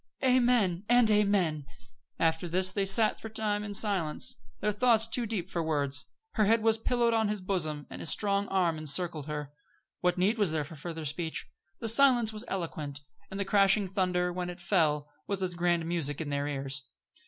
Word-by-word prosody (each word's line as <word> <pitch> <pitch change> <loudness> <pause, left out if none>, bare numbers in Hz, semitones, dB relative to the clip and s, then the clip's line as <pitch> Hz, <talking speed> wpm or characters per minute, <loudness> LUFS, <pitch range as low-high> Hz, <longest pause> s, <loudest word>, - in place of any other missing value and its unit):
"Amen! 240 -8 +3
and 240 -2 +5
amen!" 195 -9 +1 0.5
After 165 +1 0
this 185 +2 +3
they 195 0 -1
sat 215 +3 +3
for - - -6
a - - -12
time 210 -1 -1
in 205 -1 -5
silence, 195 -8 +1 0.2
their 210 - 0
thoughts 225 +1 +3
too 235 +1 -1
deep 200 -5 -3
for 175 -3 -3
words. 145 -3 0 0.2
Her 215 - +1
head 225 +2 +3
was 225 0 +3
pillowed 235 0 +1
on 220 -1 +2
his 210 0 -2
bosom, 155 -6 -3
and - - -9
his - - -3
strong 200 -1 0
arm 175 -4 0
encircled 155 0 0
her. 150 -2 -5 0.5
What 180 0 0
need 205 +6 +1
was 200 -6 +2
there 155 -1 0
of 150 +1 -9
further 165 0 -6
speech? 160 +3 -3 0.4
The 230 - -2
silence 240 -1 +5
was 215 +1 -5
eloquent; 155 -6 -4 0.3
and 195 - -6
the 200 - -1
crashing 195 +1 +3
thunder, 180 -2 -1
when 180 0 -4
it 175 +1 -8
fell, 155 -5 +1 0.2
was 195 -1 -2
as 180 -1 -1
grand 175 -1 0
music 160 -4 -1
in 160 -3 -4
their 145 0 -2
ears. 135 -2 -3
185 Hz, 195 wpm, -29 LUFS, 160-210 Hz, 0.5 s, and